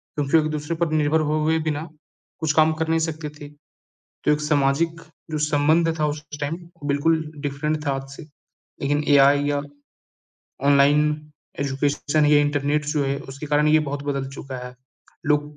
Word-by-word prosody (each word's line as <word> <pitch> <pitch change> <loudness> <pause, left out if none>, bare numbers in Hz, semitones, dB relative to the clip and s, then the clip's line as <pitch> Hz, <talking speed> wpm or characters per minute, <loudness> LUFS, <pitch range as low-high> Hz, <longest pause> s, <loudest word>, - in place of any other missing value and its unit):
क्योंकि 145 +1 +2
एक-दूसरे 155 0 -1
पर 165 -1 -1
निर्भर 155 0 +2
होए 155 +1 +2
बिना, 150 +2 -3 0.5
कुछ 160 -2 0
काम 155 0 +5
कर 160 - 0
नहीं 165 0 +2
सकते 155 -1 -6
थे। 145 - -9 0.8
तो - - +3
एक 150 - 0
सामाजिक 150 +2 +1 0.3
जो 155 - -2
संबंध 160 +3 +3
था 155 - +2
उस 150 0 -4 0.2
टाइम 145 +3 -2 0.3
बिल्कुल 160 +3 +2 0.2
डिफरेंट 150 +2 -2
था 140 - +2
आज 135 0 -5
से। - - -9 0.6
लेकिन 145 +2 0
एआई 140 +1 +5
या 145 -1 0 1.1
ऑनलाइन 145 +1 +5 0.6
एजुकेशन 145 +2 +1
या 145 0 +5
इंटरनेट 145 0 0
जो 150 -1 0
है 140 0 -1
उसके 135 +3 -7
कारण 150 +1 +2
ये 155 +1 +5
बहुत 140 0 -4
बदल 140 -2 -2
चुका 135 -1 -7
है। 125 - -10 0.5
लोग 150 0 0
150 Hz, 160 wpm, -23 LUFS, 145-155 Hz, 1.1 s, काम